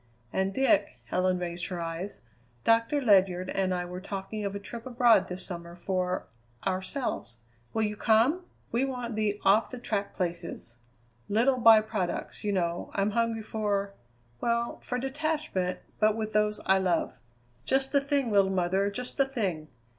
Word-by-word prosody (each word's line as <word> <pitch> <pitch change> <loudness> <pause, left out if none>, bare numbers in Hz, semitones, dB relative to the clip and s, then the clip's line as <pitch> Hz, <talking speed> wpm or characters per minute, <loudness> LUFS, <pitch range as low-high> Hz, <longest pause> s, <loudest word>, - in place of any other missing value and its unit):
"And 190 0 +1
Dick," 270 - +2
Helen 185 +9 +1
raised 175 0 -3
her 180 -2 -4
eyes, 165 +4 -5 0.4
"Doctor 230 +5 +3
Ledyard 190 -6 +3
and 190 -1 0
I 180 -1 -1
were 180 +1 -7
talking 195 +2 -5
of 200 0 -3
a - - -3
trip 230 +4 -8
abroad 240 -2 +4
this 180 +1 -3
summer 170 -2 -7
for 180 0 -1 0.4
ourselves. 190 - -2 0.3
Will 220 - 0
you 210 0 -1
come? 235 - +3 0.3
We 235 +3 +1
want 250 -4 -3
the 210 -1 0
off 205 +3 +5
the 255 - -7
track 205 -4 -3
places. 170 - -3 0.5
Little 245 +5 +3
by 225 -2 +8
products, 210 -5 -3
you 210 - 0
know. 175 -3 -1
I'm 200 +1 +1
hungry 230 0 0
for 205 -2 -1 0.5
well, 235 0 0
for 250 - -3
detachment; 270 - -1 0.2
but 215 0 +4
with 220 -1 -3
those 210 0 +2
I 190 0 +4
love." 180 -3 +1 0.5
"Just 270 0 +1
the 280 - +4
thing, 280 -4 0
little 200 -2 +4
mother, 190 +2 +1
just 250 +5 -4
the 275 - +4
thing!" 195 - -2
205 Hz, 160 wpm, -29 LUFS, 185-235 Hz, 0.5 s, by